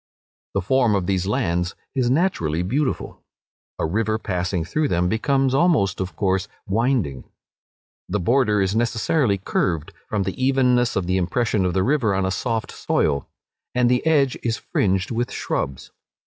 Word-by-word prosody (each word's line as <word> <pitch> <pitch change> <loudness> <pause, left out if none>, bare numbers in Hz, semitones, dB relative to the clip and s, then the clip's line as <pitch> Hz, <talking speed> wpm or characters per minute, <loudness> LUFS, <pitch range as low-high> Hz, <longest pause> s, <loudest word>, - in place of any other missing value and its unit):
The 100 - +1
form 120 0 +3
of 95 -3 0
these 95 0 0
lands 85 -3 0 0.2
is 125 -3 +1
naturally 105 - +1
beautiful. 130 +8 -2 0.6
A - - -1
river 110 +6 0
passing 90 -4 -2
through 155 - 0
them 90 -6 +1
becomes 135 +6 +1
almost, 135 - +2
of 95 0 -4
course, 95 -1 0 0.2
winding. 105 - 0 0.9
The 105 +3 0
border 105 0 +2
is 95 +2 -1
necessarily 115 0 +1
curved, 85 -4 -1 0.2
from 105 -2 0
the 95 +8 -3
evenness 125 -2 +3
of 95 - 0
the 90 +1 +1
impression 100 +2 0
of 90 - -1
the 95 - +2
river 125 -7 +2
on 95 0 0
a 95 - 0
soft 115 +2 -2
soil; 70 -2 0 0.5
and 125 -1 +3
the 125 - +2
edge 145 -5 +3
is 115 -1 -1
fringed 95 0 0
with 120 +2 -1
shrubs. 65 -1 -3
105 Hz, 160 wpm, -22 LUFS, 95-125 Hz, 0.9 s, form